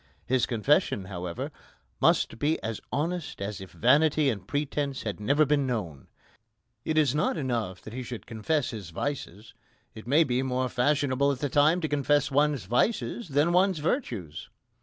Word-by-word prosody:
His 130 +3 +1
confession, 120 - +1
however, 90 -3 -5 0.5
must - - +2
be 150 +4 +1
as 110 -1 -4
honest 165 +5 -2
as 100 0 -4
if 95 - -9
vanity 145 +3 +3
and 100 -4 -7
pretence 145 -1 -2
had 105 -2 -4
never 145 +8 +3
been 145 -2 +1
known. 90 - -4 0.8
It 155 - -1
is 145 -5 +4
not 150 +3 0
enough 115 - -2
that 110 - -9
he 130 - -4
should 120 -2 -7
confess 120 +6 -1
his 105 -6 -7
vices. 105 - -5 0.4
It 110 - -11
may 150 +6 +5
be 130 -3 0
more 130 -1 -1
fashionable 140 +1 +2
at 140 - -3
the 145 +2 -2
time 155 +6 +3
to 160 - 0
confess 145 0 +1
one's 145 -4 +2
vices 190 - 0
than 145 +3 +2
one's 185 0 +3
virtues. 125 - -3
135 Hz, 165 wpm, -27 LUFS, 110-150 Hz, 0.8 s, may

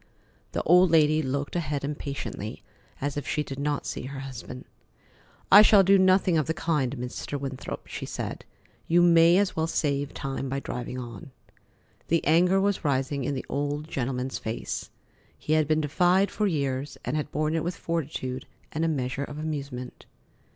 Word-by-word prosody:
The - - -1
old 180 +2 +6
lady 155 -1 +4
looked 140 +2 -3
ahead 150 -4 -2
impatiently, 140 -7 -5 0.4
as 145 +1 -2
if 145 - -4
she 150 - 0
did 135 -1 -7
not 145 0 -1
see - - -4
her 135 0 -6
husband. 130 -1 -8 0.9
"I 205 - +11
shall 210 -2 +7
do 195 +1 +5
nothing 185 -2 +4
of 150 - -1
the 160 - -1
kind, 145 -7 0
Mr. 125 +3 -5
Winthrop," 135 -1 -6
she - - -6
said. - - -5 0.4
"You 175 +1 +4
may 170 0 +6
as 200 -1 +1
well 160 0 0
save 145 -3 -1
time 135 0 -4
by 135 +1 -1
driving 125 -1 -5
on." 120 -6 -8 0.8
The 165 0 +1
anger 180 +5 +4
was 200 0 0
rising 135 -1 0
in 140 - -1
the 130 - -4
old 145 +2 -2
gentleman's 130 -2 -3
face. 110 +1 -4 0.5
He 155 - -2
had 155 -2 +3
been 155 0 +2
defied 180 +6 +3
for 210 - 0
years 140 -4 -2
and - - -1
had 150 -1 -2
borne 155 +1 0
it 165 - 0
with 175 +1 -2
fortitude 140 -7 -3 0.2
and 160 - -2
a - - +2
measure 135 -3 -1
of 145 - -9
amusement. 140 -5 -5
145 Hz, 175 wpm, -27 LUFS, 135-165 Hz, 0.9 s, I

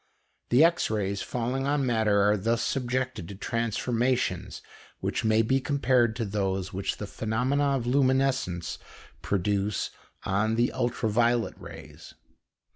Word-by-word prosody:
The 125 +6 +6
X 170 +1 +3
rays 100 -2 -1
falling 125 +3 -2
on 140 -1 +1
matter 110 -4 +2
are 105 - +4
thus 115 +3 0
subjected 130 -7 -2
to 100 - -8
transformations 115 +3 -1 0.4
which - - -2
may 110 0 +3
be 135 +4 +1
compared 130 -5 +2
to 115 - -2
those 95 -2 -2
which 95 +1 -2
the 105 - -5
phenomena 130 +7 0
of 120 - -4
luminescence 130 -8 +1 0.4
produce 100 +1 -1 0.3
on 105 +3 +1
the 120 +1 +2
ultra 120 -2 -1
violet 115 +2 +2
rays. - - -12
115 Hz, 130 wpm, -27 LUFS, 105-130 Hz, 0.4 s, The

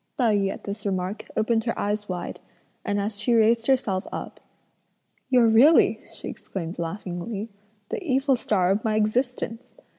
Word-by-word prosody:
Tai 230 -5 +3
yü 195 -1 +1
at - - -8
this 200 +1 -5
remark 190 0 -3
opened 225 +1 +1
her 230 - -1
eyes 205 0 -2
wide, 180 -1 -4 0.4
and 205 0 -1
as 205 +1 -3
she 235 +3 +2
raised 230 +1 +3
herself 215 -8 +1
up: - - -6 0.9
"You're 250 -3 +5
really," 235 +9 +5
she - - -6
exclaimed 170 -2 -6
laughingly, 195 +5 -4 0.4
"the 460 -2 -3
evil 270 -3 +2
star 190 -6 +1
of 205 +3 0
my 220 -1 +1
existence! 235 +2 -1
215 Hz, 155 wpm, -25 LUFS, 200-235 Hz, 0.9 s, You're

